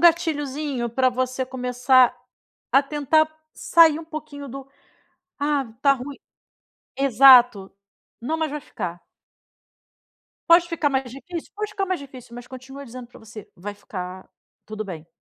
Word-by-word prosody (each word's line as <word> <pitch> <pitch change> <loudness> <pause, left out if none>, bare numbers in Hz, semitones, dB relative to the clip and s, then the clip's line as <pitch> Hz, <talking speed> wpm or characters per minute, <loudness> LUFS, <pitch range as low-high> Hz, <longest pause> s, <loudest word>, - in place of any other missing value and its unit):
gatilhozinho 295 -6 +1
para 255 +2 +2
você 255 +1 -2
começar 250 0 +3 0.6
a 275 - +6
tentar 300 +2 +2 0.3
sair 325 -2 +5
um - - -10
pouquinho 290 -3 -8
do 270 +1 -9 0.7
"Ah, 285 -2 0 0.2
tá 280 -1 +5
ruim" 275 +1 -8 0.8
exato, 245 -6 +6 0.5
"Não, 315 +7 -2
mas 315 -2 -2
vai 300 - -5
ficar". 175 - -7 1.4
Pode 340 0 +6
ficar 320 -4 0
mais 265 -2 -1
difícil? 335 +6 -8
Pode 425 0 -4
ficar 395 -2 -2
mais 370 -3 -2
difícil, 255 -4 -12
mas 245 0 -9
continua 265 +2 -10
dizendo 250 0 -10
para 245 - -16
você: 220 -2 -12
"Vai 205 +4 -7
ficar 185 -2 -8 0.4
tudo 215 0 -5
bem". 165 -4 -8
270 Hz, 140 wpm, -23 LUFS, 245-300 Hz, 1.4 s, a